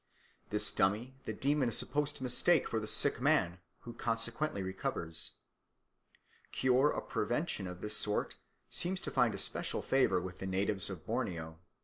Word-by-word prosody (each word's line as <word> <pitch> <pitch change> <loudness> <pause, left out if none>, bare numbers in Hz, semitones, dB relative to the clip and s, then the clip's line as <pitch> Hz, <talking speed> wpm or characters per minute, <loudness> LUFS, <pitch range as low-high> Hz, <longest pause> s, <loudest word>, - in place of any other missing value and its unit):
This 105 0 +2
dummy 110 +7 0
the - - -3
demon 140 -2 +1
is 115 - -1
supposed 150 0 0
to - - -6
mistake 130 +7 +3
for 115 - -1
the 110 - -6
sick 115 +4 +4
man, 130 - +2 0.2
who 120 - -9
consequently 115 +1 -1
recovers. 85 -3 -3 1.2
Cure 130 +3 +3
or - - -3
prevention 95 - -2
of 90 0 -8
this 105 0 +3
sort 105 0 0 0.3
seems 180 +2 0
to - - -5
find 120 -5 +2
especial - - -1
favour 135 -7 +2
with 90 +1 -7
the 95 - -4
natives 95 +1 +2
of 90 -5 -7
Borneo. 85 -9 -3
115 Hz, 155 wpm, -33 LUFS, 95-130 Hz, 1.2 s, sick